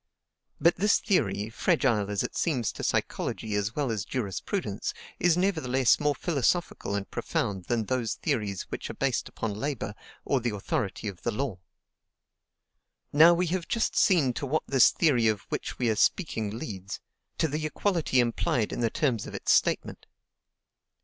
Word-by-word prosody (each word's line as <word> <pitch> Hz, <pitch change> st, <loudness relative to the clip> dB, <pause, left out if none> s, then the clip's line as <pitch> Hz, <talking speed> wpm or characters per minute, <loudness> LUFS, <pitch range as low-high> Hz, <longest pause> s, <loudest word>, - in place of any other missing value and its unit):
But 170 Hz, +1 st, +4 dB
this 205 Hz, +3 st, +4 dB
theory, 145 Hz, -, 0 dB
fragile 120 Hz, -, +1 dB
as 100 Hz, -1 st, 0 dB
it -, -, -5 dB
seems 125 Hz, -, 0 dB
to -, -, -8 dB
psychology 110 Hz, -2 st, -1 dB
as 105 Hz, +2 st, -1 dB
well 140 Hz, -5 st, 0 dB
as 105 Hz, -4 st, -2 dB
jurisprudence, 100 Hz, -3 st, -3 dB, 0.2 s
is 175 Hz, -1 st, +3 dB
nevertheless 135 Hz, -10 st, +2 dB
more 145 Hz, -1 st, +1 dB
philosophical 155 Hz, -, 0 dB
and 100 Hz, -1 st, -3 dB
profound 95 Hz, -3 st, -2 dB
than 115 Hz, +2 st, 0 dB
those 120 Hz, -2 st, -1 dB
theories 100 Hz, -5 st, -2 dB
which -, -, -6 dB
are -, -, -6 dB
based -, -, -1 dB
upon 110 Hz, -2 st, -3 dB
labor 105 Hz, -3 st, -3 dB, 0.3 s
or 135 Hz, -, +2 dB
the 120 Hz, -3 st, -2 dB
authority 100 Hz, +1 st, -2 dB
of 95 Hz, -4 st, -6 dB
the -, -, -1 dB
law. 115 Hz, -4 st, -3 dB, 1.5 s
Now, 165 Hz, +4 st, +8 dB
we 180 Hz, +2 st, +1 dB
have 185 Hz, -3 st, -2 dB
just 230 Hz, -1 st, 0 dB
seen 155 Hz, -, +4 dB
to 140 Hz, +2 st, -4 dB
what 155 Hz, +4 st, 0 dB
this 135 Hz, -3 st, +6 dB
theory 130 Hz, -9 st, +2 dB
of 105 Hz, -3 st, +1 dB
which -, -, -4 dB
we 125 Hz, -, 0 dB
are -, -, 0 dB
speaking 110 Hz, -, +1 dB
leads, 100 Hz, -7 st, -6 dB, 0.4 s
to 160 Hz, -, +2 dB
the 155 Hz, +1 st, -3 dB
equality 165 Hz, -5 st, +1 dB
implied 120 Hz, -1 st, +1 dB
in -, -, -4 dB
the 115 Hz, -1 st, +2 dB
terms 120 Hz, -5 st, 0 dB
of -, -, -8 dB
its -, -, 0 dB
statement. -, -, 0 dB
125 Hz, 165 wpm, -28 LUFS, 105-155 Hz, 1.5 s, Now